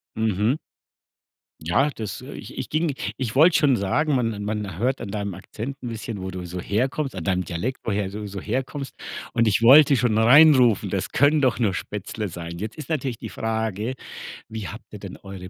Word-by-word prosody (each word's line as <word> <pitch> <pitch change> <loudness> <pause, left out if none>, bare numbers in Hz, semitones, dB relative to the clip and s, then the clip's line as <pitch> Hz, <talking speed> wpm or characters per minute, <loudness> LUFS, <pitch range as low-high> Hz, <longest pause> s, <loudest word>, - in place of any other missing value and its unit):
Mhm. 110 +4 +1 1.0
Ja, 90 - +2
das, 110 -8 -6
äh - - -9
ich - - -9
ich - - -5
ging 155 -1 0 0.2
ich 125 -2 -3
wollte 160 +6 +6
schon 135 -5 +4
sagen, 145 +11 +1
man 115 -5 -1
man 105 -4 -3
hört 125 +6 0
an 100 - -5
deinem 100 -1 -3
Akzent 110 +8 -6
'n 125 - -5
bisschen, 110 -2 -5
wo 95 - -4
du 90 -1 -6
so 90 +1 -5
herkommst 130 - -1
an 90 - -5
deinem 90 +1 0
Dialekt, 85 +11 -3
woher 100 -3 -1
du 105 +1 -6
so 100 0 -6
herkommst 130 +6 -3 0.4
und 115 -1 +3
ich 110 +2 +2
wollte 140 +4 +8
schon 115 -3 +2
reinrufen: 125 -2 +6
„Das - - -2
können 145 +2 +4
doch 130 -4 +2
nur 110 -6 +1
Spätzle 105 +3 -4
sein.“ 85 0 -7
Jetzt 110 +3 -5
ist 155 -2 -8
natürlich 135 -7 -2
die - - -7
Frage, 110 +1 -2 0.5
wie 110 -3 -6
habt - - -9
ihr - - -8
denn - - -8
eure 95 -2 -9
110 Hz, 200 wpm, -24 LUFS, 100-130 Hz, 1.0 s, wollte